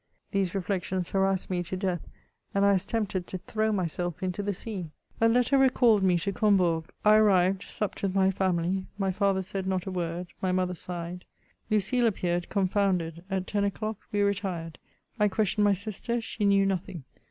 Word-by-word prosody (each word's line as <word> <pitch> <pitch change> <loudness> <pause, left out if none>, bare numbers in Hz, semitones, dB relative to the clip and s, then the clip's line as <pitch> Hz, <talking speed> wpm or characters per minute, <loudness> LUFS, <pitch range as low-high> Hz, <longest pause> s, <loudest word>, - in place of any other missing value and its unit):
These 195 -2 0
reflections 185 -1 -2
harassed 195 -1 +1
me 180 -1 0
to 175 +2 -4
death, 185 -3 -1 0.5
and 200 0 +4
I 200 - +5
was 190 -2 +2
tempted 205 -5 -2
to 185 - -5
throw 215 +4 -1
myself 175 -2 -2
into 185 +2 -2
the 205 0 -1
sea. 190 -5 -3 0.3
A 230 - +6
letter 250 +3 +3
recalled 245 -5 +4
me 185 -2 +3
to 185 +4 -2
Combourg; 180 -6 +2 0.2
I 210 0 +7
arrived 190 -3 +4
— - - -13
supped 210 - -3
with 195 -1 -1
my 190 0 +4
family; 185 0 0
my 195 -2 0
father 195 0 +1
said 190 0 -4
not 185 -2 -1
a 190 - -4
word, 175 -1 -3 0.2
my 185 - +1
mother 180 0 0
sighed, 175 0 -6 0.4
Lucile 215 +4 +2
appeared 175 -4 -1
confounded; 185 -4 0
at 190 -1 -1
ten 205 +1 -1
o'clock, 215 +1 -2
we 205 - +1
retired. 190 -5 -2 0.4
I 210 - +5
questioned 210 +1 +1
my 205 - +5
sister; 215 +4 -3
she 225 -2 -3
knew 200 0 +4
nothing. 190 -4 -3
190 Hz, 185 wpm, -28 LUFS, 180-205 Hz, 0.5 s, I